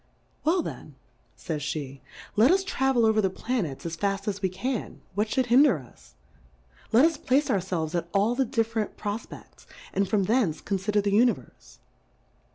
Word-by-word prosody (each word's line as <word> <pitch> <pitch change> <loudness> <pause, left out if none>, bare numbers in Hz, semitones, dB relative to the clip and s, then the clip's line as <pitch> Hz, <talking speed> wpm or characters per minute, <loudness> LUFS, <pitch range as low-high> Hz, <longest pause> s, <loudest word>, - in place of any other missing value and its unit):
Well 340 +2 +2
then, - - -8 0.4
fays 145 -3 -4
/;<?, - - -17
let 225 +5 +5
us 380 +2 +3
travel 265 - +1
over 220 -1 +3
the 190 - +1
Planets 190 - -3
as 170 0 -3
fafl 195 +3 -1
as 200 0 -4
we 190 - +1
can; 215 +6 -4
what 210 +3 0
fliould 260 +3 +1
hinder 250 - +5
us? 120 - -16 0.8
Let 240 +6 +6
us 325 -2 +1
place 275 -1 +1
our 200 - +2
felves 170 -4 -3
at 170 -1 -2
all 205 +4 +2
the 265 +2 +1
diffe 230 -2 -1
rent 215 -2 -2
Profpects, 210 +2 -7 0.3
and 195 -1 0
from 205 -2 +2
thence 210 -6 +1
confi 195 +1 -2
der 205 - +4
the 200 0 -1
Univerfe. 235 +4 0
210 Hz, 175 wpm, -26 LUFS, 185-250 Hz, 0.8 s, Let